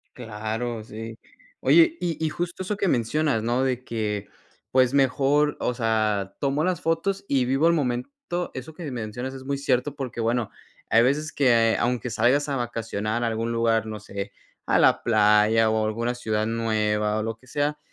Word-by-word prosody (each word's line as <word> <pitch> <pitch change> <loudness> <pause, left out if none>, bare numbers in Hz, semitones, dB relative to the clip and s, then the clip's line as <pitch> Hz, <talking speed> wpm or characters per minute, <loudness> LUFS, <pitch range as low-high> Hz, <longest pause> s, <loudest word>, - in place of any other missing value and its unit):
Claro, 110 0 -4
sí. 110 +1 -8 0.4
Oye, 335 -1 +5
y 170 -3 -2
y - - +1
justo 175 +3 -4
eso 200 +2 -3
que 200 -2 0
mencionas, 130 -1 +1
¿no? 120 +3 +1
De 130 -1 -1
que, 105 -4 -3 0.4
pues, 130 0 +3
mejor, 140 +2 +2
o 125 - 0
sea, 110 -4 0
tomo 140 +2 0
las 180 0 0
fotos 190 +5 -1
y 135 -3 +2
vivo 135 +6 +2
el 170 - +4
momento. 125 -6 -1 0.4
Eso 130 +5 -7
que 175 - -8
me 140 - -4
mencionas 120 +2 -5
es 135 -1 -9
muy 140 +1 -2
cierto, 135 0 0
porque 130 -4 -5
bueno, 115 -1 0 0.4
hay 115 - +5
veces 150 +5 +1
que 115 -5 +3
aunque 125 0 0
salgas 125 +7 +2
a 140 - -1
vacacionar 115 -2 -2
a - - +1
algún 115 +1 -2
lugar, 115 -1 +1
no 110 -1 -5
sé, 100 0 -6 0.4
a - - +3
la - - +4
playa, 110 0 +4
o 110 0 +1
alguna 115 +3 -1
ciudad 110 -3 -1
nueva, 110 -2 0
o 110 - -2
lo 115 0 -4
que 130 - -23
sea, 145 +2 -1
120 Hz, 185 wpm, -25 LUFS, 110-140 Hz, 0.4 s, Oye